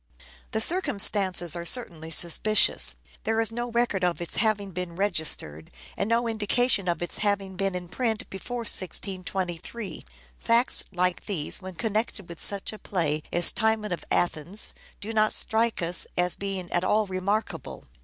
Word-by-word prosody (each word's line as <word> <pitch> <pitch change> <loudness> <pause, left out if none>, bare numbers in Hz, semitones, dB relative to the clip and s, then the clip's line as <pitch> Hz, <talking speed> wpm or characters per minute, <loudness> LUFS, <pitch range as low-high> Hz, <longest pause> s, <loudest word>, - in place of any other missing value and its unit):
The 220 - -1
circumstances 200 - +2
are 170 - -4
certainly 170 -6 -1
suspicious. 175 +6 +3 0.3
There 225 0 +1
is 225 0 +3
no 240 +1 -3
record 235 -5 +1
of 175 -1 +1
its 175 - -2
having 210 -3 +1
been 180 -1 -5
registered, 160 - 0 0.3
and 200 - -1
no 230 +1 +2
indication 220 -1 +2
of 175 0 0
its 175 - -3
having 200 -2 0
been 195 0 -1
in 180 -1 -5
print 225 +3 -2
before 240 +5 -5
1623. 185 0 -1 0.4
Facts 235 +3 +2
like 180 -1 0
these, 185 -3 0
when 190 -1 -8
connected 215 -1 -2
with 170 - -8
such 200 +1 0
a 215 - -9
play 155 -5 -1
as 175 0 +2
"Timon 220 -2 +1
of 175 - -3
Athens," 175 +4 +1 0.3
do 220 +2 -5
not 215 -1 +3
strike 225 -3 0
us 170 +1 +2
as 180 0 +3
being 195 -3 -4
at 175 - +1
all 215 +3 +3
remark 195 +3 -1
able. - - -9
195 Hz, 160 wpm, -27 LUFS, 175-220 Hz, 0.4 s, suspicious